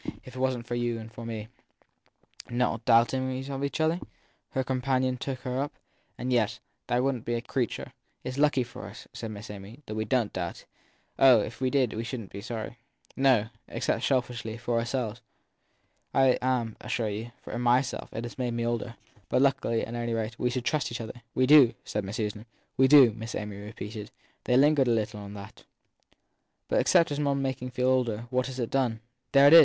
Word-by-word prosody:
If 130 Hz, -, -11 dB
it -, -, -6 dB
wasn 130 Hz, -2 st, 0 dB
t -, -, -25 dB
for -, -, -3 dB
you 120 Hz, -1 st, 0 dB
and 110 Hz, 0 st, -8 dB
for 115 Hz, 0 st, -7 dB
me 110 Hz, -2 st, -5 dB, 1.0 s
Not 120 Hz, -2 st, 0 dB
doubting 130 Hz, +2 st, +3 dB
of 135 Hz, 0 st, -3 dB
each 140 Hz, +2 st, -2 dB
other? 160 Hz, +2 st, +2 dB, 0.5 s
her 130 Hz, -, -1 dB
companion 130 Hz, 0 st, +1 dB
took 130 Hz, 0 st, -4 dB
her 130 Hz, +1 st, -1 dB
up: 145 Hz, -, -3 dB, 0.4 s
yes, 120 Hz, -3 st, +1 dB, 0.3 s
there 120 Hz, +1 st, +2 dB
wouldn 135 Hz, -3 st, 0 dB
t -, -, -21 dB
be 120 Hz, -, 0 dB
a 115 Hz, -, -1 dB
creature. 125 Hz, -4 st, -2 dB, 0.3 s
It -, -, -3 dB
s 130 Hz, +2 st, -5 dB
lucky 145 Hz, -3 st, +4 dB
for 120 Hz, -, -9 dB
us, -, -, -11 dB
said 115 Hz, -, -5 dB
Miss 105 Hz, 0 st, -8 dB
Amy, 105 Hz, +7 st, -10 dB
that 110 Hz, -, -6 dB
we 110 Hz, 0 st, -1 dB
don 120 Hz, -2 st, +1 dB
t -, -, -35 dB
doubt. 85 Hz, -2 st, -4 dB, 0.5 s
Oh, 130 Hz, -5 st, +8 dB
if 110 Hz, +3 st, -7 dB
we 130 Hz, -, +2 dB
did 130 Hz, -4 st, +2 dB
we 110 Hz, -, -3 dB
shouldn 115 Hz, -3 st, -5 dB
t -, -, -9 dB
be -, -, -7 dB
sorry. 115 Hz, +1 st, -5 dB, 0.4 s
No 130 Hz, -5 st, +4 dB, 0.2 s
except, -, -, -1 dB
selfishly, 120 Hz, -4 st, 0 dB
for 120 Hz, 0 st, 0 dB
ourselves. 120 Hz, -1 st, -2 dB, 0.9 s
I 135 Hz, -1 st, +5 dB
am, 125 Hz, -3 st, 0 dB
I -, -, -9 dB
assure 115 Hz, -2 st, 0 dB
you, 110 Hz, +3 st, -5 dB
for -, -, -7 dB
myself 125 Hz, +2 st, +1 dB
it 115 Hz, -, -4 dB
has 120 Hz, +2 st, -7 dB
made 120 Hz, -2 st, -1 dB
me 115 Hz, 0 st, -1 dB
older. 120 Hz, 0 st, -2 dB, 0.3 s
But, 130 Hz, -, +3 dB
luckily, 130 Hz, -4 st, +2 dB
at 115 Hz, -, -8 dB
any 120 Hz, -1 st, -1 dB
rate, 115 Hz, +1 st, -3 dB
we 125 Hz, -, +2 dB
trust 130 Hz, +3 st, -1 dB
each 120 Hz, -, -4 dB
other. 115 Hz, +1 st, -7 dB
We 130 Hz, -, +4 dB
do, 130 Hz, -4 st, +7 dB
said 105 Hz, -, -2 dB
Miss 100 Hz, +2 st, -5 dB
Susan. 105 Hz, +1 st, -3 dB, 0.3 s
We 130 Hz, -, +5 dB
do, 135 Hz, -5 st, +8 dB
Miss 110 Hz, +1 st, -6 dB
Amy 105 Hz, -1 st, -4 dB
repeated 105 Hz, 0 st, -7 dB, 0.4 s
they 125 Hz, -, +4 dB
lingered 145 Hz, -1 st, +5 dB
a -, -, +3 dB
little 110 Hz, -1 st, 0 dB
on 100 Hz, 0 st, -8 dB
that. 100 Hz, +2 st, -10 dB, 1.0 s
But -, -, +2 dB
except 170 Hz, -4 st, +4 dB
making 135 Hz, -3 st, 0 dB
one -, -, -8 dB
feel 125 Hz, +1 st, 0 dB
older, 120 Hz, -3 st, +1 dB
what 130 Hz, 0 st, +1 dB
has 130 Hz, -1 st, -6 dB
it 120 Hz, -, -2 dB
done 120 Hz, -5 st, +1 dB, 0.3 s
for 140 Hz, 0 st, +6 dB
one? 145 Hz, +2 st, +8 dB
120 Hz, 205 wpm, -28 LUFS, 115-130 Hz, 1.0 s, Oh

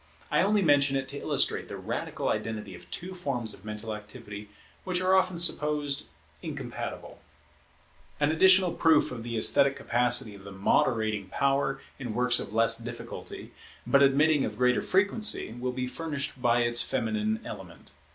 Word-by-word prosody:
I -, -, +3 dB
only 205 Hz, +1 st, +2 dB
mention 145 Hz, -3 st, +4 dB
it 135 Hz, -1 st, -3 dB
to 140 Hz, +1 st, -3 dB
illustrate -, -, +1 dB
the -, -, -7 dB
radical -, -, -4 dB
identity 105 Hz, -3 st, -3 dB
of 90 Hz, 0 st, -13 dB
two 180 Hz, -, -5 dB
forms 135 Hz, -, -3 dB
of -, -, -13 dB
mental 105 Hz, +1 st, -6 dB
activity 105 Hz, -1 st, -9 dB, 0.3 s
which 180 Hz, -1 st, 0 dB
are 185 Hz, +1 st, +2 dB
often 185 Hz, -2 st, +2 dB
supposed 150 Hz, -4 st, -1 dB, 0.4 s
incompatible. -, -, -6 dB
[Women's -, -, -32 dB
poetry] 145 Hz, -, +2 dB
An 150 Hz, -, +1 dB
additional 185 Hz, +1 st, +6 dB
proof 160 Hz, -3 st, +3 dB
of 125 Hz, -2 st, -6 dB
the 115 Hz, 0 st, -4 dB
esthetic 140 Hz, +4 st, +4 dB
capacity 120 Hz, -2 st, +1 dB
of 100 Hz, -1 st, -13 dB
the 100 Hz, -, -10 dB
moderating 110 Hz, +1 st, +1 dB
power 135 Hz, +4 st, 0 dB, 0.2 s
in 120 Hz, -5 st, -5 dB
works 125 Hz, 0 st, +2 dB
of -, -, -6 dB
less 115 Hz, +1 st, +3 dB
difficulty, 120 Hz, 0 st, -8 dB, 0.3 s
but 140 Hz, -, +4 dB
admitting 145 Hz, +2 st, +4 dB
of 105 Hz, -, -4 dB
greater 125 Hz, 0 st, +2 dB
frequency, 205 Hz, -, 0 dB
will 125 Hz, +1 st, -3 dB
be 125 Hz, 0 st, -3 dB
furnished 140 Hz, 0 st, -4 dB
by 120 Hz, -1 st, +3 dB
its 120 Hz, 0 st, +4 dB
feminine 110 Hz, -4 st, -1 dB
element. -, -, -10 dB
125 Hz, 165 wpm, -28 LUFS, 110-150 Hz, 0.4 s, additional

